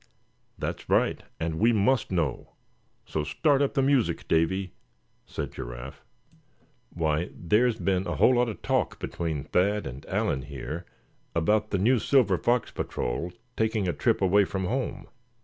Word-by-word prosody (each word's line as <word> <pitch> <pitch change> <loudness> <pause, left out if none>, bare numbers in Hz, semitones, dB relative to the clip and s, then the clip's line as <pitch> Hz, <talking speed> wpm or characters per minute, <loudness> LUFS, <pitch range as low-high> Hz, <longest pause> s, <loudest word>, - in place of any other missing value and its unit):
"That's - - -5
right, - - +2 0.2
and 80 0 -2
we 115 +2 +5
must 110 +2 +2
know; 80 -8 -1 0.5
so 75 - -2
start 140 - +2
up 140 +1 +1
the 135 - +3
music, 135 -3 +1
Davy," 90 +3 +1 0.5
said - - -4
Giraffe. - - -8 0.9
"Why, 80 0 -1
there's 110 +6 +2
been 95 -3 0
a 85 - -2
whole 125 - +5
lot 120 -1 +2
of 110 - -8
talk - - 0
between 80 -5 -3
Thad 100 +3 +1
and 70 +1 -7
Allan 65 - 0
here 75 +5 -6 0.5
about 105 +6 +2
the 100 - 0
new 120 +6 +3
Silver 110 - +3
Fox 120 +3 +1
Patrol 70 +9 -3 0.2
taking 110 -3 0
a 90 - +1
trip 115 -4 +1
away 100 +2 +5
from 95 0 -3
home. 130 +7 -3
95 Hz, 150 wpm, -27 LUFS, 80-115 Hz, 0.9 s, we